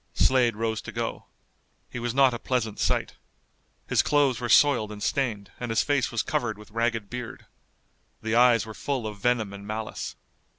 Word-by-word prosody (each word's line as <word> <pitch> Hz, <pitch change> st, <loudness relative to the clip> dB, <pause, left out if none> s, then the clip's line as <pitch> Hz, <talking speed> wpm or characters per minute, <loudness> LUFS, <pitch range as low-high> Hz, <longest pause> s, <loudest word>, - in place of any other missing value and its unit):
Slade 125 Hz, -4 st, +3 dB
rose 110 Hz, 0 st, -2 dB
to -, -, -8 dB
go. -, -, -4 dB, 0.7 s
He 125 Hz, -, -5 dB
was 120 Hz, 0 st, -3 dB
not 135 Hz, -2 st, +5 dB
a 120 Hz, -, -4 dB
pleasant 115 Hz, -5 st, -2 dB
sight. -, -, 0 dB, 0.7 s
His -, -, +3 dB
clothes 140 Hz, -5 st, +2 dB
were 120 Hz, -1 st, -3 dB
soiled 120 Hz, -5 st, +5 dB
and 105 Hz, -1 st, -7 dB
stained, 110 Hz, -8 st, -1 dB
and 120 Hz, -, -4 dB
his 115 Hz, -, +2 dB
face 145 Hz, -3 st, +1 dB
was 120 Hz, -, 0 dB
covered 110 Hz, -4 st, -1 dB
with 105 Hz, +1 st, -14 dB
ragged 115 Hz, -1 st, -1 dB
beard. 125 Hz, +1 st, -7 dB, 0.8 s
The 110 Hz, 0 st, -1 dB
eyes 120 Hz, -1 st, +5 dB
were 110 Hz, -, -8 dB
full 130 Hz, 0 st, -3 dB
of 105 Hz, -1 st, -6 dB
venom 110 Hz, -3 st, 0 dB
and 100 Hz, 0 st, -9 dB
malice. 110 Hz, 0 st, -5 dB
115 Hz, 180 wpm, -26 LUFS, 110-125 Hz, 0.8 s, not